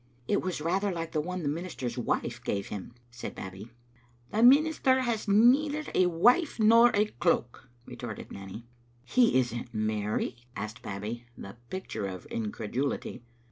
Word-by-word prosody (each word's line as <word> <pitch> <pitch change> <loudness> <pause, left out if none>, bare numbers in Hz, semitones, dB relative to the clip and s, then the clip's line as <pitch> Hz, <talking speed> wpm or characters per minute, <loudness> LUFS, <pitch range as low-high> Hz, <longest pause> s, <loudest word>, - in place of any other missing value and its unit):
" 120 0 -34
It 205 - +2
was 180 -4 -3
rather 190 +5 0
like 165 -2 -4
the 155 - 0
one 180 +2 -4
the - - -1
minister's 150 -5 -3
wife 120 0 -2
gave 100 -3 -2
him," 105 +3 -7 0.2
said 120 +1 -7
Babbie. 95 +4 -8 0.6
"The 215 - +1
minister 270 0 +5
has 235 -4 -1
neither 270 +9 +4
a 185 - +4
wife 240 - +3
nor 230 +2 +7
a 210 +1 +4
cloak," 120 - -1 0.2
re 125 - -9
torted 110 -3 -7
Nanny. 100 +4 -8 0.2
" 120 +1 -34
He 245 - +5
isn't 120 -1 -3
married?" 110 +2 -1 0.2
asked 110 +4 -6
Babbie, 110 +3 -6
the 100 +3 -9
picture 110 - -4
of 95 -2 -7
incredulity. 115 +6 -3
130 Hz, 160 wpm, -29 LUFS, -, 0.6 s, nor